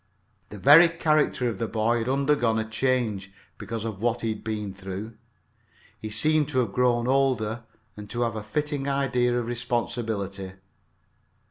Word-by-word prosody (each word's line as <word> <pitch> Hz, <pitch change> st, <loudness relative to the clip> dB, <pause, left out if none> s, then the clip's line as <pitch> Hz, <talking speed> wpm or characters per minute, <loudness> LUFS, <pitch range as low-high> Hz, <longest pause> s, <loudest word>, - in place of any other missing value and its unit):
The 105 Hz, -, -9 dB
very 150 Hz, -, +8 dB
character 155 Hz, -6 st, +1 dB
of 110 Hz, -5 st, -3 dB
the 115 Hz, -, -1 dB
boy 115 Hz, +2 st, +1 dB
had 115 Hz, +2 st, -2 dB
undergone 135 Hz, -4 st, +2 dB
a 110 Hz, 0 st, -2 dB
change 110 Hz, -5 st, -1 dB, 0.3 s
because 110 Hz, +1 st, -5 dB
of 105 Hz, -3 st, -5 dB
what 120 Hz, 0 st, 0 dB
he 115 Hz, -, -1 dB
had 110 Hz, -1 st, -5 dB
been 105 Hz, -3 st, -4 dB
through. 100 Hz, +3 st, -7 dB, 0.8 s
He 110 Hz, -, -6 dB
seemed 150 Hz, +7 st, +2 dB
to 130 Hz, -3 st, 0 dB
have 110 Hz, -5 st, -3 dB
grown 120 Hz, -1 st, +2 dB
older 125 Hz, -4 st, +1 dB, 0.3 s
and 105 Hz, -1 st, -10 dB
to 120 Hz, -, -3 dB
have 115 Hz, -2 st, -2 dB
a 110 Hz, -, -4 dB
fitting 140 Hz, +6 st, -3 dB
idea 125 Hz, -3 st, +1 dB
of 120 Hz, -, -1 dB
responsibility. 115 Hz, -5 st, -3 dB
120 Hz, 160 wpm, -26 LUFS, 110-130 Hz, 0.8 s, very